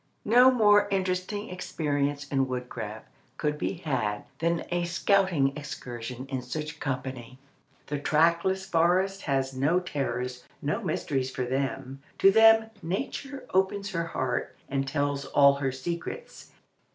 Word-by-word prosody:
No 245 +4 +7
more 210 -5 +5
interesting 190 +2 -1
experience 145 -5 -2
in 135 -1 +1
woodcraft 120 -4 -5 0.3
could 150 0 -1
be - - -1
had 130 - -2 0.2
than 170 0 0
a 175 0 0
scouting 175 -5 +2
excursion 125 -4 -6
in 135 -1 -3
such 150 +5 -5
company. 130 -2 -4 0.5
The 145 -1 -3
trackless 170 +6 +2
forest 185 +2 +2
has 135 -2 -1
no 145 +7 +2
terrors, 125 -7 -3 0.2
no 150 +10 -1
mysteries 135 -6 -1
for 130 -1 -3
them. 135 +1 -3 0.2
To 195 - +6
them 225 +1 +6
Nature 270 +9 -4
opens 195 +1 +1
her 170 -2 -1
heart, 130 -6 -2
and 135 0 -1
tells 145 -1 -1
all 140 +1 +5
her 135 -1 -1
secrets. 170 - -6
150 Hz, 130 wpm, -28 LUFS, 135-185 Hz, 0.5 s, No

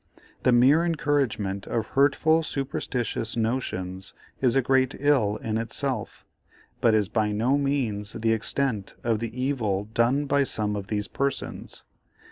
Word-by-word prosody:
The 125 - +3
mere 130 +7 +5
encouragement 140 - -1
of 110 -2 -2
hurtful 145 +4 +3
superstitious 125 -6 -3
notions 95 -6 -2 0.2
is 125 -2 +2
a 135 - +4
great 130 0 +2
ill 135 -8 +3
in 110 0 -2
itself, 125 +4 -3 0.5
but 115 -2 +4
is 105 -2 +2
by 105 0 0
no 115 +6 +2
means 125 -8 -1
the 115 0 +1
extent 115 -2 -1
of 115 -2 +1
the 115 0 -3
evil 115 -8 0
done 125 +6 +2
by 140 0 +2
some 105 -5 0
of 100 -1 -5
these 105 0 -2
persons. 140 0 -3
120 Hz, 140 wpm, -26 LUFS, 105-140 Hz, 0.5 s, mere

